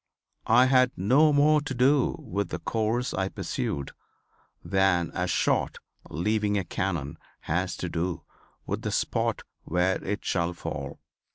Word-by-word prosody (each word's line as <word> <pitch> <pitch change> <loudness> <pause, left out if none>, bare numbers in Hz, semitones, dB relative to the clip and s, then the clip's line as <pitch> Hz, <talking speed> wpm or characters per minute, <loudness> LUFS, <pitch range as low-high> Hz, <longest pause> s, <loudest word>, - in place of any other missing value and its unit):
I 120 +3 +6
had 130 -1 +4
no 135 - +4
more 150 +1 +4
to 140 -2 -5
do 135 +2 +3
with 100 -1 -3
the - - -3
course 115 +2 -1
I 95 0 -1
pursued 70 -6 -3 0.7
than 90 -2 +2
a - - -1
shot - - +1 0.3
leaving 105 +5 0
a 100 - 0
cannon 85 -5 -3 0.2
has 90 +1 -2
to 90 - -3
do 85 -1 -3 0.4
with - - -3
the - - -3
spot - - -1 0.2
where 90 +3 0
it 105 +2 -3
shall 85 0 0
fall." 70 -5 -6
95 Hz, 145 wpm, -27 LUFS, 85-125 Hz, 0.7 s, I